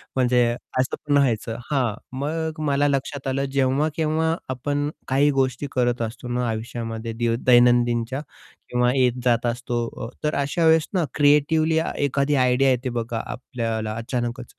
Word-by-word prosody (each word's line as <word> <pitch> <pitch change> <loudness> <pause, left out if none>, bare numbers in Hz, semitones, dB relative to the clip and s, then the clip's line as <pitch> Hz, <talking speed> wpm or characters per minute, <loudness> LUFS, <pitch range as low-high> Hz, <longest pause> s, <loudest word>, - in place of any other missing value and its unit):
म्हणजे 125 -1 +3 0.4
असं 130 - 0
पण 145 -1 +4
व्हायचं 115 -4 +1 0.2
हां, 125 -6 +1 0.2
मग 160 +2 -3
मला 145 0 +2
लक्षात 140 0 -2
आलं 135 +1 0
जेव्हा 135 +2 +2
केव्हा 160 +1 +1
आपण 145 +3 -1 0.2
काही 140 +2 +3
गोष्टी 135 +1 0
करत 120 -1 0
असतो 115 +2 -5
ना 125 0 -1
आयुष्यामध्ये 115 0 -4
दै 115 0 0
दैनंदिनच्या 120 0 +4 0.5
किंवा 125 0 +2
येत-जात 125 -2 +2
असतो, 120 0 -2 0.3
अ, - - -9
तर 150 - 0
अशा 145 +4 0
वेळेस 160 0 +4
ना 175 -4 +1
क्रिएटिव्हली 155 +2 +3 0.2
एखादी 140 +1 +1
आयडिया 130 +1 +3
येते 125 +1 -1
बघा 115 0 -3
आपल्याला 115 -4 -4
अचानकच. 120 +1 -3
130 Hz, 145 wpm, -23 LUFS, 120-145 Hz, 0.5 s, पण